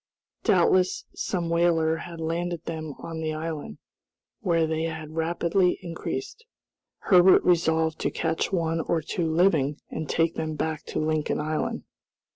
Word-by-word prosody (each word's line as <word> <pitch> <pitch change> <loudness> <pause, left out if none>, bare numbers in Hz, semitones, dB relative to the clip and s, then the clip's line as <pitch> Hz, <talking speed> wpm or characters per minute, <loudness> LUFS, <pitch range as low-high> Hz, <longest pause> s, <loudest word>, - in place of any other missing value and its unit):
Doubtless 185 0 +3
some 175 -3 -2
whaler 165 -1 +2
had 170 0 -8
landed 170 +1 -2
them 160 -3 -5
on 165 -1 -6
the 155 -1 -2
island, 155 - -5 0.6
where 165 -2 +2
they 160 0 -1
had 160 -1 -5
rapidly 170 +3 +1
increased. 390 - -5 0.6
Herbert 185 0 +6
resolved 160 -2 +2
to - - 0
catch 165 +2 -1
one 165 -3 0
or 165 0 -1
two 165 +2 -2
living, 160 -4 +2
and 155 -1 -4
take 165 0 +2
them 155 -1 -3
back 160 0 -2
to - - -5
Lincoln 155 0 0
Island. 155 +1 -2
165 Hz, 140 wpm, -26 LUFS, 160-175 Hz, 0.6 s, Herbert